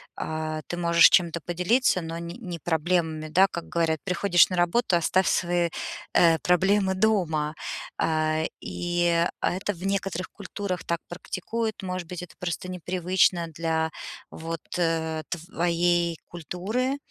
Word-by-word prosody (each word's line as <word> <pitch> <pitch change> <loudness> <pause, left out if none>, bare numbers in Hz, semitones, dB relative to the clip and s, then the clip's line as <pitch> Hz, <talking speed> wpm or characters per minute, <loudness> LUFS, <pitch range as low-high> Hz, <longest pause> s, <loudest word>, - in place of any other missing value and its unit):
а, 155 0 -3
ты 175 - -4
можешь 170 -2 +6
чем-то 170 -2 +3
поделиться, 180 +6 +2
но 165 0 -5
н 170 - -6
не 180 -1 -6
проблемами, 160 -1 0
да, 185 +5 +5
как 170 - -5
говорят: 165 -2 0
"Приходишь 180 -1 +4
на 185 - -2
работу- 175 +4 +2
оставь 185 +2 +2
свои, 175 -1 +1 0.4
э, 165 -1 +5
проблемы 190 +2 +2
дома". 175 -8 +1 0.4
А, 155 0 +1 0.2
и 175 -1 +1 0.2
это 190 +3 0
в 180 +1 -8
некоторых 195 -2 -2
культурах 200 -2 -5
так 170 0 -1
практикуют, 215 +5 -4
может 185 -2 -4
быть, 180 0 -6
это 180 - -11
просто 180 +1 -4
непривычно 180 0 +1
для, 160 0 -1 0.4
вот, 165 0 -5 0.2
э, 160 -2 0
твоей 175 0 0
культуры, 205 - -2
175 Hz, 135 wpm, -26 LUFS, 165-185 Hz, 0.4 s, можешь